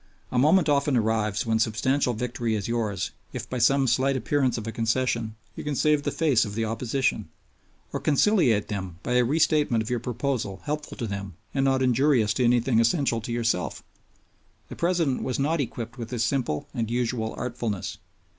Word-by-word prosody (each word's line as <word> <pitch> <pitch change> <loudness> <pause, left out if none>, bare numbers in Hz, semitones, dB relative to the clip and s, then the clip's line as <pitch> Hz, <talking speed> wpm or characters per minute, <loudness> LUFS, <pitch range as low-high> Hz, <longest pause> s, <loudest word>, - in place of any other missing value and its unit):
A 125 - +1
moment 160 +5 +4
often 140 -2 +2
arrives 110 -2 0
when 110 -1 +1
substantial 120 +3 +1
victory 120 -1 -2
is 100 -2 -3
yours 110 -5 -1 0.2
if 120 -1 -5
by 125 - -3
some 135 +3 +4
slight 130 +2 +2
appearance 130 0 +1
of 110 - -5
a 115 - -3
concession 115 -1 -1 0.2
you - - -6
can 150 -1 -2
save 150 +1 +3
the - - -1
face 145 -8 +2
of 105 -3 -5
the 115 0 0
opposition 120 +4 -1 0.6
or - - -1
conciliate 145 - +3
them 95 -5 -5
by - - -3
a 125 0 +4
restatement 145 -3 +2
of 110 - -6
your 120 - +1
proposal 120 -5 -3
helpful 150 0 -4
to 120 - -3
them 100 -3 -5 0.2
and 135 -1 +1
not 135 -1 +2
injurious 125 -4 +3
to 125 - 0
anything 120 0 +3
essential 120 0 +2
to 115 - -6
yourself. 115 -6 -1 0.9
The - - -7
President 170 -6 +1
was 130 - -2
not 150 +3 +1
equipped 120 -1 -5
with 115 -1 -5
this 120 -1 -1
simple 120 - -1
and 115 -3 -2
usual 120 -2 -1
artfulness. 120 -5 -3
120 Hz, 185 wpm, -26 LUFS, 110-135 Hz, 0.9 s, moment